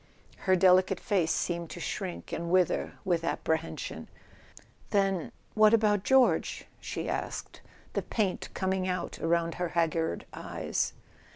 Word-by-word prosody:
Her 185 - +6
delicate 185 +1 +5
face 180 -5 +1
seemed 170 -2 -1
to - - -7
shrink 180 +1 -4
and 170 0 -3
wither 180 -1 +2
with 170 -3 +1
apprehension. 160 -1 -2 0.8
"Then—what 200 +2 +2
about 210 -3 +2
George?" 265 +1 +3
she - - -4
asked, - - -4 0.3
the - - 0
paint 205 -5 -1
coming 190 -1 0
out 180 -2 -3
about 165 0 +1
her 175 - 0
haggard 165 - +1
eyes. - - -2
185 Hz, 120 wpm, -29 LUFS, 170-195 Hz, 0.8 s, Her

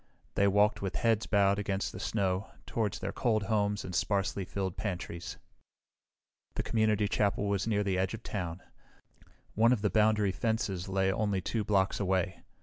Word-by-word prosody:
They 100 - +3
walked 105 +2 +3
with 95 -1 -3
heads 115 -2 +1
bowed 100 -1 +3
against 100 -1 -1
the - - -8
snow 100 0 -1 0.2
toward 110 -5 -1
their 95 - -4
cold 110 -1 +1
homes 105 0 0
and 90 - -6
sparsely 100 +2 0
filled 95 -1 -3
pantries. 90 -4 -5 1.2
The - - -1
community 110 -2 +2
chapel 105 0 +1
was 100 +1 0
near 105 -2 +1
the 95 -2 0
edge 95 +3 0
of 115 - -12
town. 90 -3 -4 0.9
One 115 +3 +4
of 115 -5 +1
the 105 - +2
boundary 105 -1 +3
fences 100 -3 -2
lay 95 0 +2
only 105 -2 0
two 110 +4 -2
blocks 100 -1 +1
away. 95 -2 0
100 Hz, 165 wpm, -31 LUFS, 95-105 Hz, 1.2 s, One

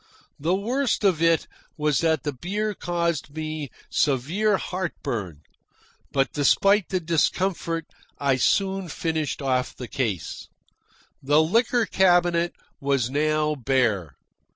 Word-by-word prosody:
The 165 +6 +1
worst 240 +5 0
of 185 -5 +3
it 165 -1 +3 0.3
was 150 -2 +1
that 160 -4 +1
the 145 - -2
beer 205 - -2
caused 170 -5 -2
me 155 -2 -4 0.2
severe 165 - +1
heart 185 -2 -3
burn; 90 -10 -4 0.7
but 135 0 +1
despite 195 +7 +3
the 185 - 0
discomfort 165 0 0 0.3
I 140 -2 +1
soon 195 +6 +1
finished 155 -3 -2
off 130 -1 0
the 125 - -7
case. 110 - -3 0.7
The 145 +3 +4
liquor 230 +7 +2
cabinet 175 -2 +3 0.3
was 135 -3 0
now 155 +1 +1
bare. 120 - 0
155 Hz, 120 wpm, -24 LUFS, 135-185 Hz, 0.7 s, The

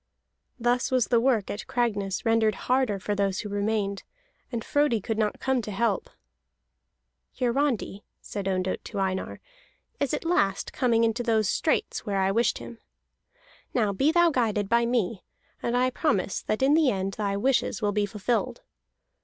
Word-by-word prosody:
Thus 245 +1 +1
was 255 -5 +1
the 235 - +4
work 235 -4 +1
at 205 - -6
Cragness 205 -6 -1
rendered 225 -1 +3
harder 255 -5 +2
for 205 +2 -3
those 195 -2 0
who 210 - -6
remained, 200 -1 -1 0.5
and 235 -2 -4
Frodi 290 -6 +2
could 220 +2 -3
not 210 -1 0
come 265 -2 +1
to 215 - -7
help. 225 +3 0 1.3
"Hiarandi," 250 -5 0 0.2
said 200 -2 -5
Ondott 185 -1 -1
to - - -7
Einar, 190 -1 -2 0.6
"is 280 -3 0
at - - -6
last 200 - +1
coming 230 -3 +2
into 230 +1 +1
those 220 -3 +2
straits - - 0
where 200 -2 -2
I 190 0 +2
wished 230 +4 +2
him. 235 - -10 1.0
Now 215 -5 +2
be 275 +10 +2
thou 345 0 +4
guided 215 -6 0
by 235 +2 +3
me, 230 -5 -1 0.4
and 240 +1 0
I 255 +1 +2
promise 210 - 0
that 215 +4 -1
in 275 +2 +5
the 310 -3 +4
end 195 -2 -2
thy 200 -1 -2
wishes 255 -1 +1
will 205 - +2
be 205 0 0
fulfilled. 210 +4 -2
225 Hz, 165 wpm, -26 LUFS, 200-245 Hz, 1.3 s, in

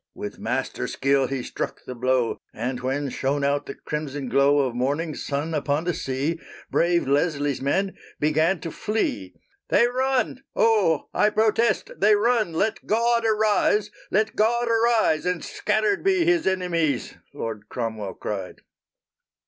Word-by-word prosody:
_" - - -64
With - - -7
master - - -2
skill 135 -1 +1
he 135 -2 -3
struck - - -5
the 125 - -6
blow, 125 -1 0 0.2
And 125 +3 -3
when 135 +3 -2
shone 140 +3 -1
out 140 +1 0
the - - -6
crimson 145 -3 -4
glow 140 +3 +4
Of 130 -3 -1
morning 145 +6 -1
sun 145 +3 -3
upon 145 0 0
the 175 0 0
sea, 140 +5 -2 0.3
Brave 170 -3 +2
Leslie's 145 -1 +1
men 190 +8 0 0.2
began 155 +4 +2
to 165 - -5
flee. 100 - -2 0.3
"They - - +5
run! 255 0 0
Oh, 205 -9 +3
I 210 - +3
protest 220 0 +1
they 210 +1 +5
run! 220 -2 +2
Let 210 +7 -1
God 235 +1 +2
arise! 210 -1 +2 0.2
Let 215 +2 +1
God 235 +3 +2
arise! 230 -8 +3
And 180 -2 -1
scattered 215 -2 0
be 380 -3 +3
His 345 - +2
enemies!" 170 -7 0 0.2
Loud 110 -2 -6
Cromwell 110 -5 -4
cried. 95 -3 -5
160 Hz, 150 wpm, -24 LUFS, 135-215 Hz, 0.3 s, They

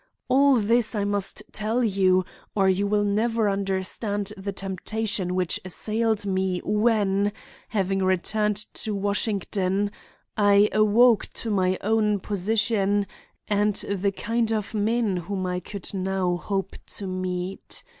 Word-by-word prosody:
All 275 +1 +5
this 230 +1 +2
I 205 - 0
must 205 0 -1
tell 220 +4 -1
you 190 -3 +3 0.3
or 195 -2 +3
you 190 +2 +2
will 205 0 +2
never 220 +2 +1
understand 200 +1 -1
the 200 0 -5
temptation 195 0 -1
which 180 -2 0
assailed 215 +3 -1
me 190 -2 0
when, 210 -2 +2 0.4
having 195 -2 0
returned 210 +3 +1 0.2
to 215 -2 -3
Washington, 200 -1 -1 0.4
I 205 0 +5
awoke 215 +2 +4
to 225 - -4
my 185 -2 +2
own 210 -1 +2
position 205 +1 +1 0.4
and 205 0 +1
the 200 -1 -1
kind 225 +3 -1
of 215 -1 -2
men 215 -2 +1
whom 185 +2 -3
I 180 0 -1
could 195 +2 -5
now 190 -2 0
hope 195 +2 -3 0.2
to 200 - -6
meet. 185 0 -4
200 Hz, 130 wpm, -25 LUFS, 190-215 Hz, 0.4 s, All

